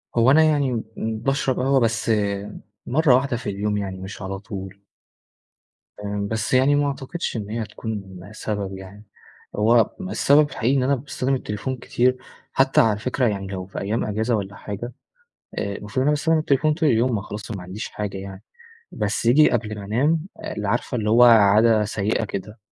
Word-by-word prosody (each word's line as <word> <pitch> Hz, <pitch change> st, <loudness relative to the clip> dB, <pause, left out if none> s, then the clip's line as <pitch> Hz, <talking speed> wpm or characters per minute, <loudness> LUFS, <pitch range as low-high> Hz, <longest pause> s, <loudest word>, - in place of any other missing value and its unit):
هو 120 Hz, +3 st, +5 dB
أنا 160 Hz, +2 st, +6 dB
يعني 140 Hz, -7 st, +1 dB
امم 110 Hz, 0 st, -3 dB
باشرب 135 Hz, 0 st, 0 dB
قهوة 135 Hz, +1 st, +3 dB
بس 115 Hz, -1 st, 0 dB, 0.7 s
مرّة 135 Hz, 0 st, +4 dB
واحدة 130 Hz, -2 st, 0 dB
في 110 Hz, -3 st, -5 dB
اليوم 105 Hz, +1 st, -1 dB
يعني 95 Hz, -2 st, -4 dB
مش 95 Hz, +2 st, -8 dB
على 95 Hz, 0 st, -5 dB
طول. 100 Hz, -1 st, -8 dB, 1.1 s
فاهم، 100 Hz, 0 st, -3 dB
بس 110 Hz, +3 st, -2 dB
يعني 135 Hz, +3 st, +4 dB
ما 145 Hz, 0 st, +2 dB
أعتقدش 140 Hz, +2 st, -4 dB
إن 105 Hz, -1 st, -5 dB
هي 115 Hz, +1 st, -3 dB
هتكون 100 Hz, -3 st, -6 dB
سبب 100 Hz, -3 st, -4 dB
يعني. 100 Hz, +3 st, -12 dB, 0.5 s
هو 115 Hz, +1 st, +3 dB
السبب 150 Hz, -6 st, +3 dB
الحقيقي 135 Hz, +1 st, 0 dB
إن 130 Hz, -, +1 dB
أنا 140 Hz, +2 st, +2 dB
باستخدم 135 Hz, 0 st, -2 dB
التليفون 130 Hz, +2 st, -4 dB
كتير 125 Hz, +2 st, +1 dB, 0.4 s
حتى 135 Hz, 0 st, +4 dB
على 105 Hz, -2 st, +2 dB
فكرة 125 Hz, +1 st, 0 dB
يعني 100 Hz, -2 st, -2 dB
لو 95 Hz, -1 st, -5 dB
في 95 Hz, -, -7 dB
أيام 105 Hz, +4 st, -1 dB
أجازة 110 Hz, +3 st, 0 dB
والّا 100 Hz, -1 st, -4 dB
حاجة 110 Hz, +4 st, -6 dB, 0.7 s
آآ 100 Hz, 0 st, -2 dB
المفروض 105 Hz, +4 st, -11 dB
إن -, -, +3 dB
أنا 145 Hz, -, +3 dB
باستخدم 160 Hz, +2 st, +2 dB
التليفون 150 Hz, 0 st, +2 dB
طول 160 Hz, -2 st, +1 dB
اليوم، 120 Hz, +1 st, +2 dB
ما 100 Hz, -, -1 dB
خلاص 105 Hz, +1 st, -8 dB
ما 100 Hz, -5 st, -5 dB
عنديش 95 Hz, +4 st, -6 dB
حاجة 105 Hz, -2 st, -5 dB
يعني، 95 Hz, 0 st, -9 dB, 0.5 s
بس 105 Hz, +2 st, -2 dB
ييجي 140 Hz, +6 st, +5 dB
قبل 110 Hz, -2 st, -1 dB
ما 100 Hz, -, -7 dB
أنام، 150 Hz, -, +1 dB, 0.2 s
ال 105 Hz, -1 st, -4 dB
عارفة 120 Hz, +4 st, -1 dB
اللي 105 Hz, -1 st, -1 dB
هو 120 Hz, +2 st, +6 dB
عادة 110 Hz, -1 st, +6 dB
سيئة 110 Hz, +1 st, -1 dB
كده، 105 Hz, +2 st, -6 dB
110 Hz, 180 wpm, -23 LUFS, 100-130 Hz, 1.1 s, أنا